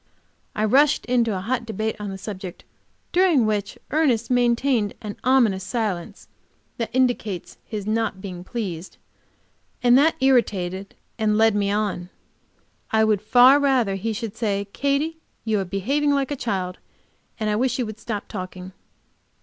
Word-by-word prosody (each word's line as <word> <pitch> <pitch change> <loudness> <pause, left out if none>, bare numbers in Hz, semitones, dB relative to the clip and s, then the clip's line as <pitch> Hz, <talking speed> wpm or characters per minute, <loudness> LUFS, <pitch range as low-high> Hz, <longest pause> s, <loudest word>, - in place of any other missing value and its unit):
I 215 - +1
rushed 280 +7 +4
into 235 -5 +1
a - - -4
hot 240 +4 -1
debate 220 -1 -3
on 205 -1 -4
the 195 - -5
subject, 190 -2 -7 0.5
during 350 -9 +4
which 210 -2 -1
Ernest 260 -7 +1
maintained 240 -2 +2
that 210 -2 -6
ominous 235 -8 +3
silence 200 -5 -3 0.5
that 230 -3 -2
indicates 240 -7 -1
his 210 -3 -5
not 220 -2 -1
being 185 -3 -7
pleased, 190 -6 -5 0.9
and 245 +1 +6
it 315 +3 +4
irritated 200 -8 +1 0.2
and 210 -1 +2
led 225 0 +5
me 200 -1 +1
on. 200 -4 -1 0.8
I 220 0 +3
would 215 -2 +2
far 250 +6 +6
rather 260 -8 +2
he 200 +4 -2
should 220 -1 -5
say, 200 -3 -1
"Katy, 285 +4 0 0.3
you 215 -2 +1
are 195 - -2
behaving 255 +11 0
like 275 0 0
a - - 0
child 190 -8 -3 0.6
and 215 - -1
I 210 - +1
wish 245 +2 +1
you 250 - -1
would 215 0 -8
stop 215 -3 -5
talking." 185 -2 -7
220 Hz, 155 wpm, -23 LUFS, 200-250 Hz, 0.9 s, and